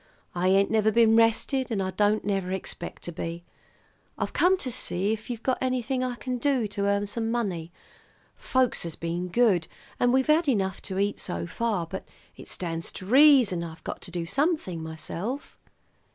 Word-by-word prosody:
"I 180 +1 0
ain't 195 +1 +4
never 220 -1 +3
been 225 0 +5
rested, 230 +3 +2
and 220 -4 -1
I 190 -1 -1
don't 205 +3 +1
never 195 -2 -1
expect 185 -2 -6
to 175 - -5
be. 165 +1 -5 0.7
I've - - -3
come 370 +2 +4
to 260 -8 -3
see 200 -1 0
if 220 +2 -7
you've 235 -2 -5
got 260 - 0
anything 255 0 0
I 250 -1 -2
can 250 0 -4
do 265 -3 +1
to 200 0 -1
earn 200 0 +1
some 225 +2 -2
money. 190 -8 -2 0.6
Folks 260 -1 +1
has 170 -2 -4
been 170 +2 -3
good, 185 -4 +3 0.3
and 245 - +3
we've 260 +1 +3
had 310 +2 +3
enough 195 -6 0
to 190 - -3
eat 200 +1 0
so 85 0 -3
far; 210 - -1
but 190 +4 -7 0.3
it - - -12
stands 165 -2 -4
to 185 - -5
reason 255 - +6
I've 160 -1 -9
got - - -5
to - - -6
do 175 -1 -3
something 195 - 0
myself." 165 - -5
205 Hz, 185 wpm, -27 LUFS, 180-245 Hz, 0.7 s, reason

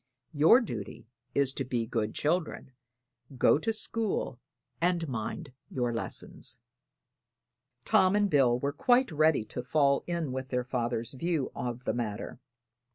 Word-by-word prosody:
Your 160 - +6
duty 115 - -6 0.3
is 140 -2 +2
to 135 - -2
be 120 -3 -1
good 110 -2 -2
children, 160 -3 -1 0.7
go 135 - +5
to 225 - 0
school 220 - -2 0.4
and 170 -1 +1
mind 130 +4 -4 0.2
your 120 -2 -1
lessons." 115 - -4 1.3
Tom 185 +1 +4
and 205 0 +3
Bill 135 -8 +4
were 140 +3 -2
quite 245 - +3
ready 155 -6 +3
to 125 - -5
fall 140 +1 +2
in 170 -5 -2
with 130 0 -4
their 125 -1 0
father's 120 -1 -2
view 160 0 -1
of 120 0 -4
the - - -1
matter. 115 -1 -4
135 Hz, 140 wpm, -30 LUFS, 120-170 Hz, 1.3 s, Your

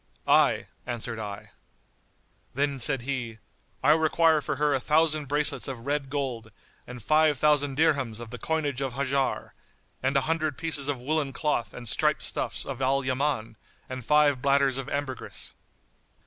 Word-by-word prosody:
"I," - - +4 0.2
answered 120 -2 -4
I. 100 -2 -7 1.0
Then 140 0 0
said 135 -1 +1
he, 125 -4 -3 0.5
"I - - +6
require 160 0 +4
for 150 0 -2
her 150 +1 +1
a 135 - +1
thousand 155 +1 +2
bracelets 145 +2 +2
of 125 -3 -7
red 140 -1 -1
gold 130 -5 -3 0.4
and 125 -2 -9
five 155 +2 +3
thousand 145 -1 +2
dirhams 140 -8 +1
of 120 -1 -9
the 125 - -7
coinage 145 -4 -1
of 135 -3 -2
Hajar[FN#90] 135 0 -1 0.5
and 135 +2 +1
a - - +3
hundred 155 -2 -1
pieces 150 -4 0
of 145 -3 -1
woollen 145 +1 -1
cloth 150 -7 -1
and 120 -1 -9
striped 100 - +1
stuffs[FN#91] - - -2
of 135 -1 -7
Al 135 +1 +1
Yaman 130 -4 -1 0.3
and 130 -1 -6
five 145 -1 +3
bladders 140 -1 +3
of 135 0 -5
ambergris." 140 -3 -4
140 Hz, 160 wpm, -27 LUFS, 125-150 Hz, 1.0 s, I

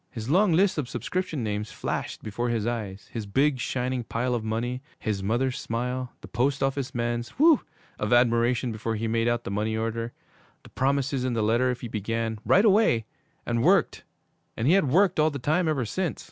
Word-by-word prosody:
_ - - -46
His 115 +1 -5
long 190 +3 +4
list 185 0 +3
of 130 -5 -3
subscription 180 -8 -3
names 105 0 -3
flashed - - -4
before 120 +3 -2
his 115 -3 -1
eyes, 105 -5 -4
his 110 -3 -4
big, 135 +6 +2
shining 125 0 -2
pile 125 +2 -1
of 120 -2 -1
money, 120 +3 -2 0.2
his 105 -4 -2
mother's 120 +6 0
smile, 125 +2 -3
the - - -10
post 135 +3 0
office 135 -1 -2
man's 120 0 -1
'whew!' 310 0 +6 0.4
of 105 - -2
admiration 120 0 +3
before 110 +1 -3
he 110 +1 -2
made 115 +1 +1
out 120 0 0
the - - -5
money 110 +2 -1
order, 115 +1 -2 0.5
the - - -14
promises 135 0 0
in 130 -1 0
the 115 -2 0
letter 120 +4 +2
if 125 -1 -3
he 120 - -4
began 115 0 -2
'right 200 +4 +4
away' 200 - +4 0.4
and 115 -1 0
worked - - +3 0.5
and 115 - -1
he 165 - +5
had 190 -8 +3
worked 185 +3 +3
all 155 +1 +4
the 145 - -5
time 155 +7 +1
ever 140 -6 0
since! 175 - -2
120 Hz, 200 wpm, -26 LUFS, 115-140 Hz, 0.5 s, whew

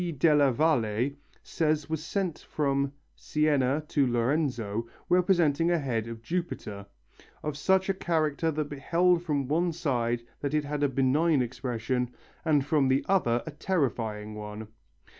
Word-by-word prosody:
della 145 -2 +5
Valle 125 -4 +1 0.3
says 155 -2 0
was 160 -1 -3
sent 185 -1 -2
from 140 -2 0 0.2
Siena 150 -2 +1
to 140 -3 +2
Lorenzo, 120 -3 0 0.2
representing 170 -3 +3
a 175 - +3
head 120 -7 -2
of 115 0 -8
Jupiter, 115 - -4 0.6
of 150 -1 -2
such 190 +6 +2
a 195 - +2
character 160 -3 0
that 155 -1 -2
beheld 170 +5 +2
from 145 -6 -1
one 170 +5 +1
side 120 -8 -1 0.2
it 145 +1 0
had 145 0 -3
a 145 - +3
benign 135 +3 +2
expression, 125 0 -2 0.3
and 150 -4 +2
from 145 -3 +2
the 135 +2 +2
other 120 -12 +2
a 160 - -5
terrifying 120 - -2
one. 105 0 -7
145 Hz, 140 wpm, -28 LUFS, 125-160 Hz, 0.6 s, della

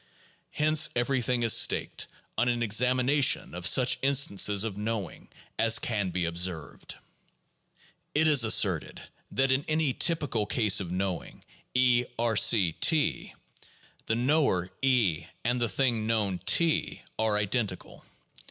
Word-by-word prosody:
Hence 155 0 +2
everything 125 -1 -1
is 115 - +4
staked - - +1 0.3
on 125 - 0
an 120 -1 -1
examination 125 +5 +1
of 90 +1 -1
such 125 +2 +3
instances 105 -7 +2
of 110 -4 -5
knowing 105 -2 -6 0.3
as 115 0 +3
can 105 -5 -2
be 90 0 -3
observed. 85 -1 -3 1.2
It 160 +1 +2
is 145 -6 +4
asserted 100 -7 +1 0.3
that 135 0 +1
in 130 +2 +1
any 155 -3 0
typical 145 - -1
case 105 -3 +2
of 95 -4 -5
knowing 95 -1 -5 0.3
(E)R 120 -2 +1
C 100 -5 +4
(T), 155 -2 0 0.7
the 110 - 0
knower 120 - 0
(E) 120 - 0 0.2
and 120 +1 -1
the 120 - 0
thing 115 +1 -1
known 105 -5 -1
(T) 165 -2 0 0.2
are 110 -1 +1
identical. 105 -2 -3
115 Hz, 125 wpm, -27 LUFS, 100-130 Hz, 1.2 s, is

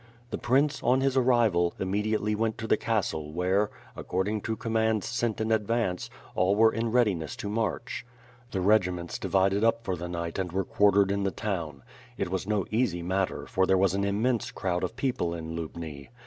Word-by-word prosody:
The - - -3
prince, 140 +4 +2
on 130 +2 +3
his 135 -1 +1
arrival, 115 -9 +3
immediately 105 +2 0
went 110 0 0
to 115 - -5
the 110 - +4
castle 95 -10 -1
where, 95 +5 +1 0.3
according 100 +4 -2
to 110 - -2
commands 110 -2 0
sent 115 -1 -1
in 110 0 -1
advance, 110 -4 0 0.2
all 95 +2 +2
were 110 +1 +5
in 115 0 -1
readiness 100 -11 +1
to - - -5
march. 110 +2 -2 0.5
The 95 - -2
regiments 90 -3 +1
divided 95 +2 +2
up 115 0 +2
for 95 -4 -1
the 90 0 -6
night 85 0 -4
and 90 -2 -2
were 95 +1 -1
quartered 100 0 +3
in 100 0 0
the 100 - +1
town. 85 -9 -4 0.3
It - - -2
was 95 0 -2
no 105 -4 +1
easy 110 -7 0
matter, 95 +2 -1
for 95 0 +1
there 95 - +4
was 95 -1 +3
an 100 0 0
immense 110 +4 0
crowd 90 -1 -2
of 90 +5 -2
people 120 -10 -1
in 80 0 -6
Lubni. 80 -3 -6
100 Hz, 190 wpm, -28 LUFS, 90-110 Hz, 0.5 s, were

